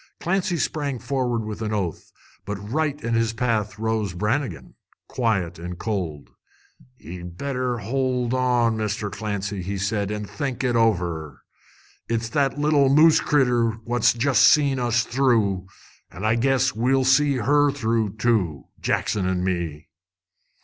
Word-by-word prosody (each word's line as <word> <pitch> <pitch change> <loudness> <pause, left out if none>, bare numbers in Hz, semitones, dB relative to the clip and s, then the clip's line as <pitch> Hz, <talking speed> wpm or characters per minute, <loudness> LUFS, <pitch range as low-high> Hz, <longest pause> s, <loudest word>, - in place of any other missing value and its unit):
Clancy 180 0 0
sprang 145 -4 -2
forward 120 -2 -2
with 110 +1 -6
an 110 -1 -2
oath, 95 -6 -3 0.3
but 100 - -4
right 145 +9 -2
in 115 - -1
his 115 0 +1
path 110 -3 -1
rose 110 -4 -1
Brannigan, 105 - -2 0.3
quiet 95 -9 -1
and 90 +1 -6
cold. 90 -10 -4 0.7
"Ye 90 -5 -9
better 125 +8 -3
hold 125 +2 -1
on, 125 -3 +2
Mr. 105 -1 -2
Clancy," 100 -2 -4 0.2
said 100 +1 -1
he, 105 - -2
"an' 105 0 -5
think 135 +3 -4
it 125 -2 +1
over. 90 -9 0 0.7
It's 115 0 -1
that 140 +1 0
little 145 -2 +3
moose 155 +3 +6
critter 125 -5 +2
what's 120 0 +2
jest 130 +3 +2
seen 140 -3 +5
us 120 -1 +1
through, 115 -7 +1 0.4
an' 95 +5 -7
I 110 - +3
guess 130 +2 +2
we'll 130 +4 +1
see 140 +2 +4
her 145 +4 +3
through, 115 -6 -1
too, 105 - 0
Jackson 95 -3 0
an' 90 -1 -1
me!" 85 -5 -3
115 Hz, 140 wpm, -23 LUFS, 100-130 Hz, 0.7 s, moose